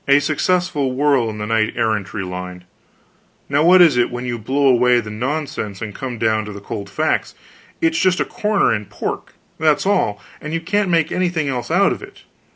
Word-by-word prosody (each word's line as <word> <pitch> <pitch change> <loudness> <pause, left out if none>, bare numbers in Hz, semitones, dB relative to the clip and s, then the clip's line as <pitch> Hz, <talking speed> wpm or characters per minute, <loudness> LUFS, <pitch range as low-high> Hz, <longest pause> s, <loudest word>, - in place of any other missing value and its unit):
A 140 0 +6
successful 150 -1 0
whirl 135 -4 +2
in 105 - -6
the 105 - -4
knight 110 0 +1
errantry 105 -2 -1
line 90 0 -7 0.8
now 140 +1 +1
what 180 +2 +7
is 155 -7 +4
it 120 - +3
when 120 0 -5
you 120 -1 -3
blow 135 +6 +1
away 125 -1 +4
the 105 -2 -6
nonsense 125 -4 -3
and 110 -2 -6
come 125 +2 -5
down 110 -1 +1
to 105 - -7
the 100 - -8
cold 100 0 -6
facts? 155 +11 -1 0.5
It's 330 0 +2
just 185 -1 +2
a - - +1
corner 210 - +1
in 105 -1 -3
pork, - - -6 0.2
that's 155 +1 +2
all, 105 - +1 0.2
and 155 +2 -4
you - - 0
can't 200 +3 0
make 165 -2 +2
anything 175 -5 0
else 125 -2 -3
out 195 +4 +3
of - - -4
it. 390 0 -13
130 Hz, 200 wpm, -19 LUFS, 110-165 Hz, 0.8 s, what